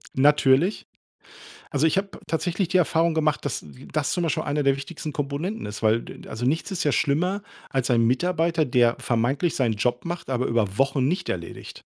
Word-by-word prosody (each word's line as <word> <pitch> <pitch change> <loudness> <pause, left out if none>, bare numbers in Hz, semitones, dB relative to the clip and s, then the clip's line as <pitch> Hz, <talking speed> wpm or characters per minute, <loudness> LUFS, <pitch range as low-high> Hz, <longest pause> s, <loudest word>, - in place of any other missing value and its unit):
Natürlich. 145 +5 +4 0.8
Also, 145 0 +1
ich 160 - +1
habe 195 +1 0 0.2
tatsächlich 175 +3 -1
die 185 +2 +2
Erfahrung 165 -1 +2
gemacht, 155 -2 0
dass - - -3
w - - -13
das 155 -2 0
zum 175 - 0
Beispiel 165 - 0
einer 145 0 -1
der 135 -1 +3
wichtigsten 150 +2 -6
Komponenten 145 +10 -3
ist, 105 0 -6
weil 110 +1 +3
d - - -9
äh, - - -13
d - - -12
also, 115 +3 -4
nichts 160 +9 0
ist 190 - -1
ja 145 - +2
schlimmer 175 - +1 0.3
als 135 -2 -1
ein 120 -2 +4
Mitarbeiter, 165 +5 +1
der 120 -2 +3
vermeintlich 130 +8 0
seinen 120 -5 +1
Job 120 +3 0
macht, 170 -2 -5
aber 130 -1 0
über 105 -4 0
Wochen 135 -1 +2
nicht 180 +6 -1
erledigt. 85 -2 -6
145 Hz, 200 wpm, -24 LUFS, 125-170 Hz, 0.8 s, Natürlich